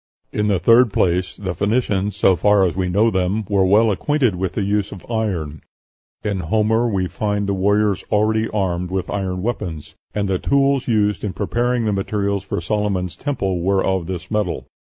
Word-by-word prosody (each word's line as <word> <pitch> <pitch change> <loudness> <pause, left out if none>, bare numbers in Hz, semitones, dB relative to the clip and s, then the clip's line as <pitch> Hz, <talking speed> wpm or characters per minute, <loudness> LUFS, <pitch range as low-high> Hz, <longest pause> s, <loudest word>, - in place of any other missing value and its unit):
"In 105 0 0
the 100 -2 +2
third 115 +6 +5
place, 90 -1 0
the 95 -3 -4
Phoenicians, 100 0 0
so 95 -2 +4
far 105 +3 +3
as 90 -3 0
we 90 -1 -1
know 105 +5 +3
them, 95 +3 0
were 100 -2 +2
well 110 +3 +4
acquainted 130 +2 +1
with 90 0 -3
the 100 - -1
use 100 0 0
of 95 - -10
iron; 90 -10 -2 0.6
in 100 -2 -1
Homer 110 +7 +1
we 95 -5 0
find 105 +1 -2
the 100 - 0
warriors 100 +1 +1
already 110 +1 +2
armed 90 -4 -1
with 95 0 -3
iron 95 -2 -2
weapons, 90 -10 -4 0.2
and 100 -1 0
the 95 -1 0
tools 140 -1 +2
used 105 -3 +1
in 100 -3 -2
preparing 120 +5 0
the 105 - +1
materials 100 0 -1
for 100 - -3
Solomon's 95 -1 -1
Temple 100 - -2
were 95 +2 +1
of 95 -3 0
this 90 -2 -6
metal." 105 -5 -1
100 Hz, 185 wpm, -20 LUFS, 95-110 Hz, 0.6 s, third